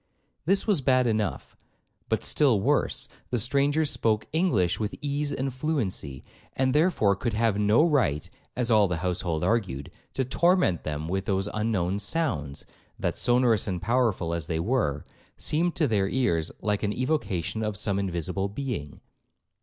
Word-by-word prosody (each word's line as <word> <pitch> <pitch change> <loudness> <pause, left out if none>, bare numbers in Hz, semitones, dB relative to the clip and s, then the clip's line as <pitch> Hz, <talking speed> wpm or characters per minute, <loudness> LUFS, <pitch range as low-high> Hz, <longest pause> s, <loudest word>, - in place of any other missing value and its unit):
This 195 +4 +2
was 200 -9 +2
bad 130 -1 +3
enough; 110 -3 -2 0.5
but, - - 0
still 135 -8 +3
worse, - - +1 0.2
the 125 - 0
stranger 140 +6 +2
spoke 110 -6 +1
English 115 - +2
with 105 -1 -2
ease 145 0 -2
and 135 -1 -2
fluency, 115 - -2 0.3
and 130 -1 +1
therefore 150 - +3
could 115 +3 -2
have 110 -2 +1
no 105 +7 +4
right, 110 - +1 0.3
as 120 -1 0
all 105 -2 +5
the 90 -2 -2
household 85 -3 -1
argued, 95 - -1 0.2
to 130 - 0
torment 170 - +2
them 75 0 -4
with 95 +2 -2
those 95 -1 0
unknown 100 -3 0
sounds, 100 - -1 0.3
that, - - -1
sonorous 120 -4 +3
and 90 -3 -2
powerful 110 -7 +1
as 85 -3 -3
they 80 -1 -1
were, 85 - 0 0.3
seemed 170 +3 0
to 155 - +2
their 100 -4 +1
ears 85 -12 0
like 105 -1 0
an 105 -1 0
evocation 115 - -1
of 105 -2 -2
some 100 -1 0
invisible 95 +1 -2
being. 105 - -5
110 Hz, 155 wpm, -27 LUFS, 95-130 Hz, 0.5 s, all